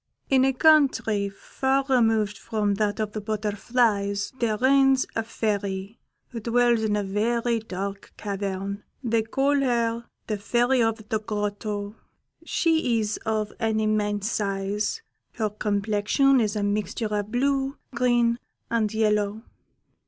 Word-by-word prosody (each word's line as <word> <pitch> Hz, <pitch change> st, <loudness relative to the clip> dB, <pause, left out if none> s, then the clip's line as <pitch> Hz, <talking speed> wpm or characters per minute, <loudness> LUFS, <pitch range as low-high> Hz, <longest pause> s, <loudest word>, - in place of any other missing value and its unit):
"In 260 Hz, -1 st, +5 dB
a 270 Hz, -, +3 dB
country 260 Hz, -9 st, +3 dB
far 265 Hz, +7 st, -1 dB
removed 225 Hz, -5 st, +2 dB
from 205 Hz, 0 st, -1 dB
that 205 Hz, +1 st, -1 dB
of 215 Hz, -1 st, -1 dB
the 215 Hz, -, -5 dB
butterflies 205 Hz, -1 st, 0 dB
there 220 Hz, -3 st, +1 dB
reigns 270 Hz, +1 st, +4 dB
a 225 Hz, -, +1 dB
Fairy, 205 Hz, -2 st, -3 dB, 0.3 s
who 235 Hz, -, -6 dB
dwells 235 Hz, +1 st, +2 dB
in 215 Hz, -1 st, +1 dB
a 205 Hz, -, 0 dB
very 230 Hz, +4 st, 0 dB
dark 200 Hz, -1 st, -6 dB
cavern: 200 Hz, 0 st, -4 dB, 0.2 s
they 230 Hz, -2 st, +2 dB
call 275 Hz, +6 st, +1 dB
her 235 Hz, -3 st, 0 dB, 0.2 s
the 215 Hz, -2 st, -3 dB
Fairy 240 Hz, +4 st, +2 dB
of 225 Hz, -1 st, -1 dB
the 220 Hz, -, +1 dB
Grotto. 210 Hz, 0 st, -3 dB, 0.5 s
She 320 Hz, -8 st, +1 dB
is 210 Hz, -1 st, -1 dB
of 215 Hz, -1 st, -1 dB
an 220 Hz, -2 st, +1 dB
immense 210 Hz, 0 st, 0 dB
size; 205 Hz, -, -2 dB, 0.3 s
her 215 Hz, -3 st, -1 dB
complexion 210 Hz, +6 st, +2 dB
is 215 Hz, -1 st, 0 dB
a 210 Hz, -, -1 dB
mixture 210 Hz, +2 st, -1 dB
of 205 Hz, 0 st, -3 dB
blue, 270 Hz, +2 st, 0 dB, 0.2 s
green, 240 Hz, -1 st, +2 dB, 0.3 s
and 220 Hz, -3 st, +1 dB
yellow. 210 Hz, -1 st, 0 dB
220 Hz, 135 wpm, -25 LUFS, 205-240 Hz, 0.5 s, In